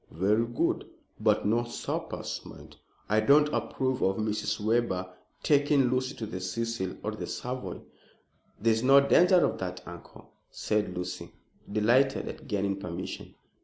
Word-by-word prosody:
"Very 105 Hz, +7 st, +1 dB
good; 120 Hz, -, -1 dB, 0.3 s
but -, -, +2 dB
no 115 Hz, +3 st, +2 dB
suppers, 120 Hz, -, -4 dB
mind. -, -, -13 dB, 0.3 s
I 105 Hz, +1 st, +3 dB
don't 145 Hz, +7 st, +5 dB
approve 130 Hz, -1 st, -1 dB
of 95 Hz, 0 st, +2 dB
Mrs. 110 Hz, 0 st, -1 dB
Webber 105 Hz, -4 st, 0 dB, 0.3 s
taking 145 Hz, -3 st, +3 dB
Lucy 130 Hz, +1 st, -1 dB
to 110 Hz, -, -5 dB
the 100 Hz, -3 st, -6 dB
Cecil 95 Hz, +1 st, -3 dB
or 105 Hz, -, -2 dB
the 110 Hz, -, -6 dB
Savoy." 125 Hz, +1 st, -5 dB, 0.8 s
"There 115 Hz, +2 st, +3 dB
is 110 Hz, -, -1 dB
no 135 Hz, +2 st, +7 dB
danger 175 Hz, +6 st, +5 dB
of -, -, -2 dB
that, 90 Hz, -1 st, -5 dB
uncle," 85 Hz, -1 st, -12 dB, 0.2 s
said 105 Hz, -4 st, -1 dB
Lucy, 90 Hz, -1 st, -5 dB, 0.4 s
delighted 120 Hz, +6 st, +2 dB
at -, -, -8 dB
gaining 100 Hz, -3 st, -1 dB
permission. 85 Hz, -3 st, -6 dB
110 Hz, 145 wpm, -28 LUFS, 95-130 Hz, 0.8 s, no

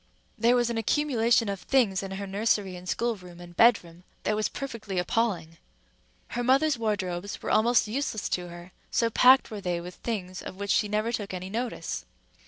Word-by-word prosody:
There 235 Hz, +2 st, +3 dB
was 240 Hz, -1 st, +2 dB
an 230 Hz, -, -1 dB
accumulation 235 Hz, -2 st, +2 dB
of 200 Hz, -1 st, -3 dB
things 220 Hz, -8 st, +2 dB
in 195 Hz, -, -6 dB
her 195 Hz, +1 st, -5 dB
nursery 200 Hz, -1 st, 0 dB
and 180 Hz, 0 st, -8 dB
schoolroom 185 Hz, -7 st, -3 dB
and 175 Hz, 0 st, -12 dB
bedroom 180 Hz, -6 st, +3 dB, 0.2 s
that 215 Hz, -, +1 dB
was 215 Hz, 0 st, 0 dB
perfectly 225 Hz, -8 st, -5 dB
appalling. 180 Hz, -4 st, -1 dB, 0.7 s
Her 245 Hz, -, -2 dB
mother's 275 Hz, +4 st, +3 dB
wardrobes 200 Hz, -4 st, -2 dB
were -, -, -2 dB
almost 235 Hz, +1 st, +4 dB
useless 225 Hz, -2 st, -2 dB
to 180 Hz, -1 st, -2 dB
her, 175 Hz, +1 st, -11 dB, 0.2 s
so 230 Hz, -1 st, +1 dB
packed 255 Hz, +3 st, +6 dB
were 210 Hz, -2 st, -5 dB
they 175 Hz, -2 st, -1 dB
with 175 Hz, +1 st, -8 dB
things 185 Hz, -5 st, -5 dB
of -, -, -8 dB
which 200 Hz, +1 st, -3 dB
she 210 Hz, -, +3 dB
never 215 Hz, +2 st, 0 dB
took 205 Hz, -5 st, -3 dB
any 185 Hz, +1 st, -6 dB
notice. 235 Hz, +2 st, -3 dB
210 Hz, 185 wpm, -27 LUFS, 185-235 Hz, 0.7 s, packed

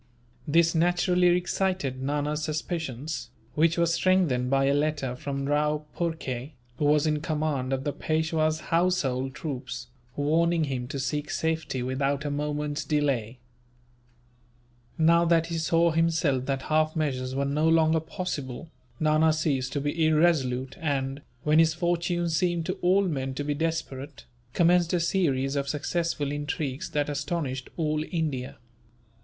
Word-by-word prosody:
This 165 Hz, +2 st, +4 dB
naturally 175 Hz, +1 st, +3 dB
excited 180 Hz, -7 st, -1 dB
Nana's 145 Hz, +2 st, -1 dB
suspicions, 150 Hz, -5 st, -3 dB, 0.2 s
which 165 Hz, +2 st, +2 dB
were 170 Hz, -, +4 dB
strengthened 170 Hz, -7 st, +2 dB
by 135 Hz, 0 st, +3 dB
a 140 Hz, -, +3 dB
letter 145 Hz, -3 st, 0 dB
from 140 Hz, +1 st, -4 dB
Rao 150 Hz, +1 st, +1 dB
Phurkay, 150 Hz, -5 st, -3 dB, 0.3 s
who 150 Hz, -, +1 dB
was 150 Hz, +1 st, +4 dB
in 150 Hz, -1 st, +1 dB
command 150 Hz, -4 st, -1 dB
of 135 Hz, 0 st, -1 dB
the 145 Hz, -, -2 dB
Peishwa's 155 Hz, 0 st, 0 dB
household 135 Hz, -7 st, +1 dB
troops, 125 Hz, -4 st, -5 dB, 0.3 s
warning 165 Hz, +3 st, +2 dB
him 130 Hz, -4 st, -3 dB
to 140 Hz, -, -5 dB
seek 145 Hz, +3 st, -2 dB
safety 160 Hz, -5 st, -1 dB
without 135 Hz, +3 st, -1 dB
a 145 Hz, -, -1 dB
moment's 150 Hz, 0 st, -2 dB
delay. 135 Hz, -6 st, 0 dB, 1.6 s
Now 170 Hz, +1 st, +5 dB
that 165 Hz, -1 st, +3 dB
he 165 Hz, -, -1 dB
saw 165 Hz, +1 st, +3 dB
that 145 Hz, -5 st, +1 dB
half 155 Hz, 0 st, +1 dB
measures 130 Hz, -4 st, -1 dB
were 140 Hz, +1 st, 0 dB
no 150 Hz, +3 st, +2 dB
longer 160 Hz, 0 st, +4 dB
possible, 160 Hz, -4 st, -5 dB, 0.3 s
Nana 155 Hz, 0 st, +4 dB
ceased 145 Hz, -5 st, 0 dB
to 145 Hz, -, -1 dB
be 145 Hz, +3 st, -1 dB
irresolute 135 Hz, -5 st, +2 dB
and, 140 Hz, -3 st, -2 dB, 0.2 s
when 150 Hz, +1 st, +4 dB
his 160 Hz, -1 st, +4 dB
fortunes 175 Hz, -1 st, 0 dB
seemed 175 Hz, -2 st, +1 dB
to 185 Hz, -, -3 dB
all 185 Hz, +3 st, +4 dB
men 135 Hz, -7 st, -2 dB
to 145 Hz, -, -2 dB
be 145 Hz, 0 st, -1 dB
desperate, 145 Hz, -3 st, -4 dB, 0.3 s
commenced 175 Hz, 0 st, +3 dB
a 175 Hz, -, +3 dB
series 145 Hz, -6 st, +1 dB
of 140 Hz, -1 st, -1 dB
successful 150 Hz, -1 st, -1 dB
intrigues 145 Hz, -2 st, -3 dB
that 145 Hz, -1 st, 0 dB
astonished 145 Hz, -2 st, -3 dB
all 155 Hz, -2 st, 0 dB
India. 150 Hz, -7 st, -2 dB
150 Hz, 140 wpm, -27 LUFS, 135-165 Hz, 1.6 s, Now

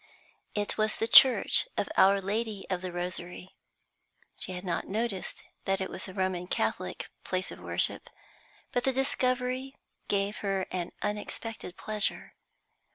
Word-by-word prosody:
It 205 Hz, +1 st, -1 dB
was 215 Hz, 0 st, +2 dB
the 225 Hz, -, -1 dB
church 260 Hz, -, +7 dB
of -, -, 0 dB
Our 195 Hz, +1 st, +6 dB
Lady 210 Hz, 0 st, -2 dB
of 180 Hz, -1 st, -1 dB
the 185 Hz, -1 st, -4 dB
Rosary. 180 Hz, +1 st, -6 dB, 0.8 s
She 185 Hz, -, +2 dB
had 180 Hz, +1 st, -6 dB
not 170 Hz, -2 st, -2 dB
noticed 210 Hz, -2 st, -2 dB, 0.2 s
that 195 Hz, 0 st, +1 dB
it 190 Hz, -, -3 dB
was -, -, -5 dB
a 190 Hz, -, -9 dB
Roman 185 Hz, -2 st, -1 dB
Catholic -, -, -2 dB
place 185 Hz, 0 st, -1 dB
of -, -, -9 dB
worship, -, -, 0 dB, 0.6 s
but 245 Hz, -, 0 dB
the 265 Hz, -, +2 dB
discovery 255 Hz, 0 st, 0 dB, 0.3 s
gave 200 Hz, +1 st, 0 dB
her 195 Hz, -2 st, -1 dB
an 180 Hz, -2 st, -3 dB
unexpected 210 Hz, -1 st, -4 dB
pleasure. 215 Hz, -1 st, -2 dB
200 Hz, 145 wpm, -29 LUFS, 185-225 Hz, 0.8 s, church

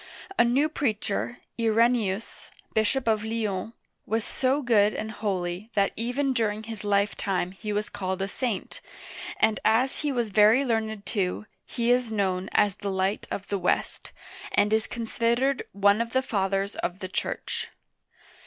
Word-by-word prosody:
A -, -, +8 dB
new 260 Hz, +6 st, +3 dB
preacher, 200 Hz, -, -1 dB, 0.2 s
I 230 Hz, -, +1 dB
re 225 Hz, +2 st, +5 dB
ne'us, 225 Hz, -4 st, -2 dB, 0.2 s
bishop 220 Hz, +4 st, +1 dB
of 215 Hz, -1 st, +2 dB
Lyons, 220 Hz, -2 st, -2 dB, 0.3 s
was 225 Hz, 0 st, 0 dB
so 270 Hz, +5 st, 0 dB
good 215 Hz, -4 st, +4 dB
and 220 Hz, 0 st, -3 dB
holy 190 Hz, -1 st, -3 dB
that 200 Hz, -1 st, +3 dB
even 255 Hz, +4 st, 0 dB
during 220 Hz, -3 st, 0 dB
his 225 Hz, -1 st, -7 dB
lifetime 200 Hz, -2 st, 0 dB
he 210 Hz, +3 st, -6 dB
was 210 Hz, +1 st, -1 dB
called 190 Hz, -1 st, -3 dB
a -, -, -1 dB
saint, 230 Hz, -1 st, -3 dB, 0.6 s
and 220 Hz, -, +3 dB
as 240 Hz, +5 st, +3 dB
he 295 Hz, -1 st, 0 dB
was 240 Hz, -5 st, -1 dB
very 215 Hz, +6 st, +5 dB
learned 220 Hz, -3 st, -1 dB
too, 195 Hz, -1 st, -1 dB, 0.2 s
he 235 Hz, -1 st, 0 dB
is 245 Hz, -2 st, +2 dB
known 190 Hz, -3 st, 0 dB
as 205 Hz, -1 st, +3 dB
the 200 Hz, -, -3 dB
"Light 190 Hz, +1 st, -1 dB
of 200 Hz, -, -4 dB
the 200 Hz, -, 0 dB
West,*' -, -, -1 dB, 0.4 s
and 210 Hz, +1 st, +3 dB
is 220 Hz, 0 st, +2 dB
considered 235 Hz, +3 st, 0 dB
one 200 Hz, +2 st, +3 dB
of 230 Hz, 0 st, -3 dB
the 260 Hz, 0 st, +2 dB
Fathers 195 Hz, -2 st, -1 dB
of 180 Hz, -, -2 dB
the 190 Hz, -1 st, -5 dB
Church. 185 Hz, -, -3 dB
215 Hz, 160 wpm, -27 LUFS, 200-235 Hz, 0.6 s, A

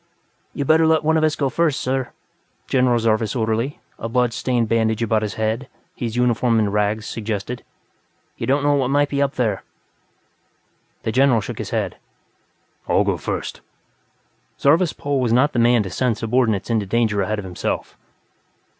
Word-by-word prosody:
"You'd 140 Hz, -, -2 dB
better 160 Hz, +2 st, +4 dB
let 160 Hz, -1 st, +3 dB
some 160 Hz, +1 st, +2 dB
of 160 Hz, -, +2 dB
us 155 Hz, 0 st, +2 dB
go 140 Hz, -, 0 dB
first 155 Hz, +1 st, +1 dB
sir," 130 Hz, 0 st, -1 dB, 0.6 s
General 125 Hz, -2 st, +3 dB
Zarvas' 110 Hz, -1 st, +1 dB
orderly, 115 Hz, +4 st, -1 dB, 0.2 s
a 115 Hz, -, -4 dB
blood 125 Hz, 0 st, +1 dB
stained 120 Hz, -1 st, 0 dB
bandage 110 Hz, 0 st, +1 dB
about 110 Hz, -1 st, +1 dB
his 105 Hz, -3 st, -3 dB
head, 110 Hz, +4 st, -1 dB, 0.3 s
his 115 Hz, -3 st, -4 dB
uniform 120 Hz, -1 st, +2 dB
in 105 Hz, -2 st, +1 dB
rags, 105 Hz, +1 st, 0 dB
suggested. 110 Hz, +2 st, -4 dB, 0.7 s
"You -, -, -5 dB
don't 140 Hz, +2 st, +2 dB
know 145 Hz, 0 st, +3 dB
what 135 Hz, -3 st, +1 dB
might 145 Hz, +1 st, +2 dB
be 140 Hz, 0 st, -1 dB
up 140 Hz, -1 st, 0 dB
there." 110 Hz, -7 st, 0 dB, 1.4 s
The 110 Hz, -, -1 dB
General 130 Hz, -1 st, +4 dB
shook 100 Hz, -, -6 dB
his -, -, -4 dB
head. -, -, -2 dB, 0.9 s
"I'll -, -, +4 dB
go -, -, 0 dB
first." -, -, -4 dB, 1.0 s
Zarvas 160 Hz, +4 st, +4 dB
Pol 140 Hz, -2 st, -1 dB
was 120 Hz, -3 st, +1 dB
not 135 Hz, +5 st, +3 dB
the 120 Hz, -, 0 dB
man 120 Hz, -1 st, +4 dB
to 95 Hz, -, -6 dB
send 120 Hz, +1 st, 0 dB
subordinates 115 Hz, -3 st, 0 dB
into 110 Hz, -3 st, 0 dB
danger 110 Hz, -1 st, +1 dB
ahead 105 Hz, +3 st, -1 dB
of 105 Hz, -, -5 dB
himself. 90 Hz, -2 st, -4 dB
120 Hz, 170 wpm, -21 LUFS, 110-135 Hz, 1.4 s, better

